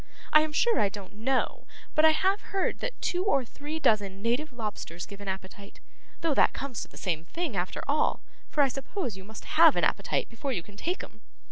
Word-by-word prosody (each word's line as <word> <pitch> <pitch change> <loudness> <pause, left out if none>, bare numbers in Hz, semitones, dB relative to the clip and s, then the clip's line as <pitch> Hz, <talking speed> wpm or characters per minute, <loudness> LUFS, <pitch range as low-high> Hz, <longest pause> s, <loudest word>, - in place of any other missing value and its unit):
I 305 - +9
am 310 0 -1
sure 460 +9 +3
I 200 - +3
don't 195 -1 -9
know, 255 +5 -1 0.3
but 310 - +5
I - - +9
have 380 +6 +2
heard 390 -2 -1
that - - -4
two 360 +1 +1
or 280 -10 +2
three 295 +6 -6
dozen 200 -8 +1
native 250 +6 0
lobsters 210 -7 -5
give 200 0 -11
an 200 - -8
appetite, 190 +1 -6 0.4
though 330 -3 +2
that - - +4
comes 270 -4 -4
to - - -5
the - - -15
same 165 -4 -1
thing 315 - -3
after 180 0 -2
all, 290 +2 +1 0.3
for 295 - +3
I - - +4
suppose 270 - -4
you 190 - -10
must 220 +3 -10
have 320 -1 +6
an - - +1
appetite - - +1
before 255 +4 -3
you 175 -7 -2
can 205 - -15
take 355 - -2
'em. - - -12
260 Hz, 220 wpm, -29 LUFS, 200-310 Hz, 0.4 s, I